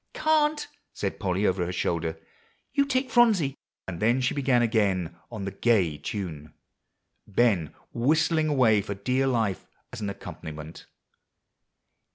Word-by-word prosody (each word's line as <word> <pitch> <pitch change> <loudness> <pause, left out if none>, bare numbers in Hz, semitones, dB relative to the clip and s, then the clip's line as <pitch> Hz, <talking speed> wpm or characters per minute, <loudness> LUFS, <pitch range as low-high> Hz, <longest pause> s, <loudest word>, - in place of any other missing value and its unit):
"Can't," 310 -1 +2 0.3
said 100 - -3
Polly 95 0 0
over 95 -2 +1
her 85 - -2
shoulder; 85 -2 -2 0.5
"you 280 0 +3
take 260 -1 0
Phronsie;" 205 - +4 0.3
and 85 -3 -5
then 120 +4 +3
she 125 - +1
began 130 -4 +2
again 100 -7 +1 0.2
on 105 -4 -5
the 95 - -3
gay 95 -8 +2
tune 80 -8 -6 0.7
Ben 100 -7 +1 0.2
whistling 155 +5 +2
away 125 -8 +4
for 100 0 -5
dear 130 +7 0
life 115 -7 0 0.3
as 120 - -6
an 100 - -2
accompaniment. 80 -5 -8
110 Hz, 135 wpm, -27 LUFS, 90-135 Hz, 0.7 s, Phronsie